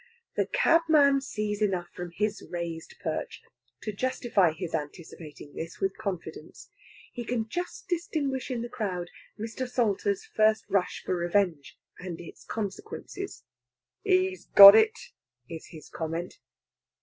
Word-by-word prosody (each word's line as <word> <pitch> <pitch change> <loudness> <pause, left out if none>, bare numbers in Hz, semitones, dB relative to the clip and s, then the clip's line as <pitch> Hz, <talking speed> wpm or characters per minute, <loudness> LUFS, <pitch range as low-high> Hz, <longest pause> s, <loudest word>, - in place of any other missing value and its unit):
The - - +1
cabman 320 - +4
sees 215 -5 -3
enough 185 -4 0
from 175 0 -6
his 210 0 -1
raised 170 -2 -5
perch - - -3 0.4
to 215 - -3
justify 220 -5 +1
his 165 +1 -6
anticipating 150 -1 -7
this 165 +1 -7
with 195 0 -1
confidence. 165 -5 -7 0.4
He 240 - -5
can 230 -2 -2
just 355 - -5
distinguish 305 -8 -2
in 240 -3 -2
the - - -4
crowd 180 -7 -4 0.3
Mr. 230 +4 -4
Salter's 250 - 0
first 220 - +2
rush 190 -2 0
for - - 0
revenge 175 -4 0 0.2
and 180 -2 -6
its 170 - -11
consequences. 220 - -6 0.6
"He's 375 -1 +1
got 200 0 +12
it!" 435 - +4 0.5
is 165 -1 -8
his 155 -3 -12
comment. 165 +2 -5
210 Hz, 130 wpm, -28 LUFS, 175-265 Hz, 0.6 s, got